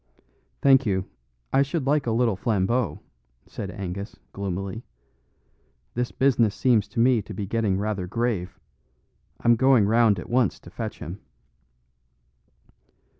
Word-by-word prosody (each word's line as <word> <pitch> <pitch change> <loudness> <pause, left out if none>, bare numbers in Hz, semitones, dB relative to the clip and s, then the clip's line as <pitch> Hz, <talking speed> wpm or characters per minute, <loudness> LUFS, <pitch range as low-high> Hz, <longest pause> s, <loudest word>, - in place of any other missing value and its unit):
"Thank 135 -2 +5
you; 95 -2 0 0.5
I 135 - +5
should 140 +1 -1
like 145 -1 +1
a - - +1
little 115 -2 +2
Flambeau," 100 -2 0 0.4
said 100 - -6
Angus, 100 +2 -6 0.2
gloomily. 100 +3 -4 1.1
"This 125 +1 -2
business 120 -6 +2
seems 115 -5 +2
to 110 +3 -5
me 120 -1 +4
to 105 0 -9
be 100 - -3
getting 105 -2 0
rather 100 -2 -2
grave. 95 -5 -2 0.8
I'm 120 0 +5
going 130 -3 +4
round 110 -1 +4
at 90 - -7
once 120 -4 +1
to - - -13
fetch - - -5
him." 90 +6 -7
110 Hz, 130 wpm, -25 LUFS, 95-125 Hz, 1.1 s, Thank